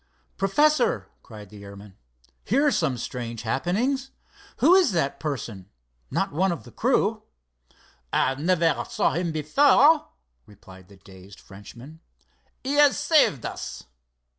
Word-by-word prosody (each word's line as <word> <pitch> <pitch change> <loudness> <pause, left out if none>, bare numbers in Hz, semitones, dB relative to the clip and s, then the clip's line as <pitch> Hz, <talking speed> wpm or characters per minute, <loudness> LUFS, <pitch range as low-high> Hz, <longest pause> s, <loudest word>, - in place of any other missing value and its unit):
"Professor!" 220 - +1
cried 105 -3 -13
the 105 -1 -12
airman. 100 0 -13 0.5
"Here 275 +8 +1
are 290 - +3
some 130 - 0
strange 120 -2 -6
happenings. 230 - -1 0.5
Who 350 - +5
is 370 - +4
that 140 -5 -1
person—not 95 - -6
one 185 +5 0
of 170 - -5
the 120 - -14
crew?" - - 0 0.9
"I - - +1
never 165 +2 0
saw - - 0
him 170 +2 -2
before," 280 - +3 0.4
replied 95 -2 -16
the 100 0 -18
dazed 95 +1 -16
Frenchman. 120 +10 -13 0.6
"He 270 +2 -2
has 290 -2 +5
saved 285 - +2
us." - - -7
140 Hz, 125 wpm, -24 LUFS, -, 0.9 s, Who